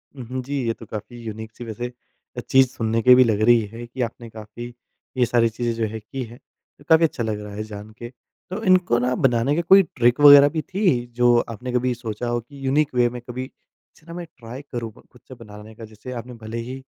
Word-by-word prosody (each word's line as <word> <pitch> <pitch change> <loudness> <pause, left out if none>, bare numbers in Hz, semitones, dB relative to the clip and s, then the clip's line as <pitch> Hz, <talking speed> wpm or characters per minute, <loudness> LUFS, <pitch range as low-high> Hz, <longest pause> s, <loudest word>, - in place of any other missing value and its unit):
हुँ, 130 -3 -8
हुँ। 130 +1 -4
जी 140 +1 -3
ये 115 - +1
तो 115 - -13
काफ़ी 110 +3 -8
यूनिक 110 0 -7
सी 120 - -9
वैसे 120 +2 -5 0.6
चीज़ 135 0 +5
सुनने 115 -2 -2
की 125 +2 +7
भी 130 - +7
लग 110 -3 0
रही 120 +1 +5
है 120 +1 -7
कि 125 +2 -6
आपने 115 0 -5
काफ़ी 110 +2 -9 0.4
ये 125 - +4
सारी 115 -1 +2
चीज़ें 120 +1 -2
जो 115 -1 -1
है 110 - -5
की 125 +5 -6
है। 120 0 -11 0.5
काफ़ी 160 0 +6
अच्छा 135 -6 -3
लग 110 -2 -2
रहा 105 -1 -9
है 105 +1 -4
जान 105 0 -9
के। 120 - -8 0.4
तो 190 +4 -5
इनको 185 - +3
ना 125 +1 0
बनाने 125 +2 +2
का 170 - +1
कोई 195 0 +8
ट्रिक 120 +1 +3
वगैरह 145 0 +9
भी 155 +1 -3
थी 180 - 0
जो 120 0 +4
आपने 125 +3 -6
कभी 125 0 +1
सोचा 120 -1 -5
हो 120 0 0
कि 135 +4 -12
यूनिक 145 +2 +1
वे 120 -1 +3
में 120 0 -8
कभी 125 +1 -6
इसे 150 +3 -25
ना 170 - -9
मैं 175 0 -6
ट्राई 120 +3 -9
करूँ 115 -3 -4
ख़ु - - -19
ख़ुद 125 - -23
से 130 - -10
बनाने 105 +1 -12
का 115 - -10
जैसे 110 +3 -11
आपने 125 0 -7
भले 110 +1 -5
ही 130 +1 -6
120 Hz, 240 wpm, -22 LUFS, 115-130 Hz, 0.6 s, वगैरह